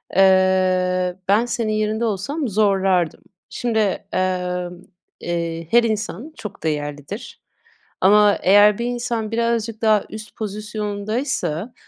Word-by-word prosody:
eee, 185 -1 +3
ben 210 +5 +3
senin 230 -2 -2
yerinde 215 +2 0
olsam 235 - -2
zorlardım. 195 -5 +1 0.3
Şimdi, 235 -2 -1 0.3
emm, 180 -1 -2 0.4
eee, 165 -1 -3
her 240 0 +6
insan 220 - -3
çok 210 -2 -9
değerlidir. 145 - -4 0.6
Ama, 205 +1 +5
eğer 205 +2 +6
bir 235 - -3
insan 240 -2 -2
birazcık 230 -1 -1
daha 215 -2 +3
üst 215 0 -9
pozisyondaysa 210 - -3
205 Hz, 105 wpm, -21 LUFS, 185-225 Hz, 0.6 s, her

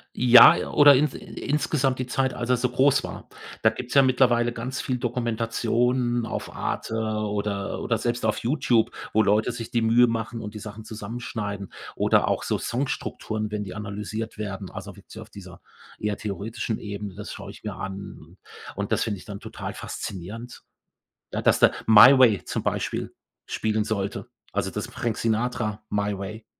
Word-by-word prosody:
Ja, 125 +6 +8
oder 145 -2 +8
in 145 +3 +4
insgesamt 140 -1 -1
die 130 - -1
Zeit, 130 +1 0
als 125 0 -4
er 125 - +4
so 125 +1 +1
groß 135 +3 +3
war. - - -9 0.3
Da 110 - +6
gibt's 125 +2 -7
ja 140 - +7
mittlerweile 125 -2 +3
ganz 125 +3 -4
viel 130 - -2
Dokumentationen 120 0 0
auf - - -5
Arte 110 - -3
oder 105 -2 -2
oder 115 - 0
selbst 120 0 -2
auf 110 - +1
YouTube, 120 -3 +1 0.2
wo 110 0 +4
Leute 105 +4 +2
sich 115 -1 -7
die 120 - +1
Mühe 120 +2 +5
machen 115 0 -3
und 105 -1 -7
die 105 - -7
Sachen 110 +1 -9
zusammenschneiden. 105 -2 -5 0.2
Oder - - +3
auch - - 0
so - - 0
Songstrukturen, 110 -4 -3
wenn 105 -1 -2
die 95 - -7
analysiert 105 +2 -5
werden, 95 -2 -5
also, 100 - -8
wirklich 100 - -15
so 110 - -8
auf 110 - -12
dieser 95 -3 -12 0.4
eher 105 -1 -2
theoretischen 110 +2 -4
Ebene, 100 -2 -6
das 105 +1 -7
schaue 100 -1 -8
ich - - -15
mir 105 -2 -5
an. 95 0 -8 0.4
Und - - -4
das - - +2
finde 105 -2 -2
ich - - -14
dann 100 -2 -7
total - - -7
faszinierend, 105 +7 -7 0.7
d - - -1
dass - - +3
der - - +5
„My 115 +5 +9
Way“ 115 -7 +5
zum - - -3
Beispiel - - -2 0.3
spielen 110 0 -1
sollte, 100 -2 -3 0.3
also, - - -1
das - - -4
Frank 115 -3 -3
Sinatra 110 -2 -1
„My 100 -1 -1
Way“, 105 +3 -7
110 Hz, 175 wpm, -25 LUFS, 105-120 Hz, 0.7 s, My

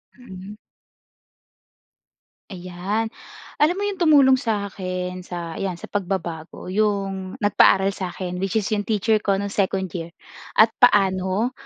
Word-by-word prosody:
Mm. 200 -4 -11 1.9
Ayan. 190 +4 -3 0.5
Alam 315 +5 +4
mo 400 - -3
yun 405 -2 -3
tumulong 280 -6 +5
sa 210 -6 -2
akin 185 -1 -4
sa 175 -2 -6
'yan, 190 -2 -2
sa 170 - -11
pagbabago, 180 -3 -4
'yong 195 -2 -1
nagpaaral 195 -1 +4
sa'kin 180 -1 -5
which 195 +1 -2
is 215 -2 0
'yong 205 -1 -1
teacher 215 0 +2
ko 200 -1 +1
no'ng 200 +1 -3
second 190 -2 -1
year. 170 0 -7 0.4
At 220 +1 +6
paano? 195 0 +3
195 Hz, 130 wpm, -22 LUFS, 185-215 Hz, 1.9 s, At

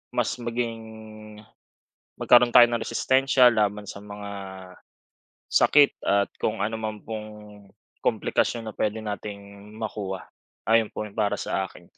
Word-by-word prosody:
mas 120 -2 0
maging 120 -1 -3 1.4
magkaroon 120 0 +5
tayo 120 -1 +8
ng 120 -1 -2
resistensya 130 +1 +4
laban 105 -3 0
sa - - -7
mga 100 0 -8 1.2
sakit 145 -1 +5
at 100 0 +2
kung 110 -1 -1
anuman 110 -1 -4
pong 110 -1 -6 0.7
komplikasyon 115 -1 0
na 110 - -6
puwede 110 +2 -2
nating 100 0 -8
makuha. 100 -4 -5 0.4
Ayon 115 -1 +3
po 110 - -5
para 105 -2 0
sa - - -2
akin. - - -16
110 Hz, 120 wpm, -25 LUFS, 105-120 Hz, 1.4 s, tayo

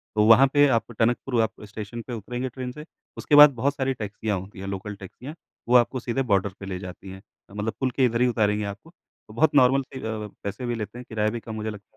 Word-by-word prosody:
तो 105 - +4
वहाँ 130 +4 +8
पे 145 0 +6
आप 115 -2 0
टनकपुर 120 +1 +1
आप 110 -1 -3
स्टेशन 110 +3 -7
पे 125 - -5
उतरेंगे 125 +4 -4
ट्रेन 125 0 -6
से, 150 +4 -10 0.3
उसके 145 - +1
बाद 150 0 +11
बहुत 140 +5 0
सारी 135 0 0
टैक्सियाँ 105 -2 -3
होती 95 +1 -11
हैं, 95 - -6
लोकल 100 +1 -5
टैक्सियाँ, 125 - -10 0.3
वो 125 - +3
आपको 125 +1 +4
सीधे 125 +3 -2
बॉर्डर 100 0 +3
पे 100 - -7
ले 95 -1 -5
जाती 95 +1 -9
हैं, 95 0 -10 0.3
मतलब 105 +1 -3
पुल 130 -1 0
के 130 +1 +2
इधर 120 0 0
ही 125 - +5
उतारेंगी 105 -3 +1
आपको, 100 +10 -7 0.4
तो 110 - -13
बहुत 150 +4 +2
नॉर्मल 135 0 +5
से 130 - -6
अ, 110 -1 -4 0.2
पैसे 105 +5 -5
भी 120 -1 -1
लेते 110 +2 -6
हैं, 125 - -9
किराया 110 -1 0
भी 120 +1 -4
कम 110 -1 -8
मुझे 110 0 -3
लगता 105 0 -11
115 Hz, 245 wpm, -25 LUFS, 105-130 Hz, 0.4 s, बाद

